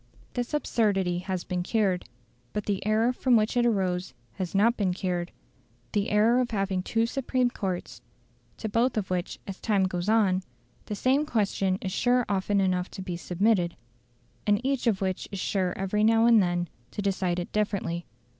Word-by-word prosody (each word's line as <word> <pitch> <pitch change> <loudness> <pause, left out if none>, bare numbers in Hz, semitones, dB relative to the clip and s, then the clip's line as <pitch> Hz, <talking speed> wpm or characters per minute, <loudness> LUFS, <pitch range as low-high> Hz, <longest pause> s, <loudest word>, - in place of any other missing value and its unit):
This 245 +4 -2
absurdity 195 -10 +1
has 185 -1 -3
been 180 -1 -2
cured; 190 - 0 0.4
but 210 - -2
the 200 -2 -1
error 225 +3 +3
from 250 0 +3
which 215 +1 +2
it 240 0 +3
arose 185 - 0 0.2
has 185 -1 -4
not 230 +4 +4
been 190 -5 0
cured 180 -2 -2 0.6
the 205 -1 0
error 220 +4 +4
of 250 -1 0
having 195 -3 -1
two 225 +4 +1
supreme 255 0 0
courts, 185 -6 -4 0.6
to 220 - -4
both 230 +3 +1
of 195 -3 -2
which 180 -1 -2
as 195 -1 -7
time 205 -4 +2
goes 185 +1 -1
on, 200 -4 +3 0.5
the 210 - -3
same 265 +7 +2
question 200 -8 0
is 190 - -3
sure 245 +4 +2
often 200 0 +1
enough 185 -1 +1
to 190 - -7
be 180 -2 -4
submitted, 180 0 +1 0.7
and 205 0 +4
each 270 -3 0
of 205 -4 +2
which 190 -1 -2
is 200 - -4
sure 185 -1 0
every 195 +2 0
now 225 +1 +5
and 230 -2 +6
then 175 -1 0 0.2
to 205 - -5
decide 190 -3 0
it 175 - -4
differently. 195 -5 -1
200 Hz, 180 wpm, -27 LUFS, 185-225 Hz, 0.7 s, and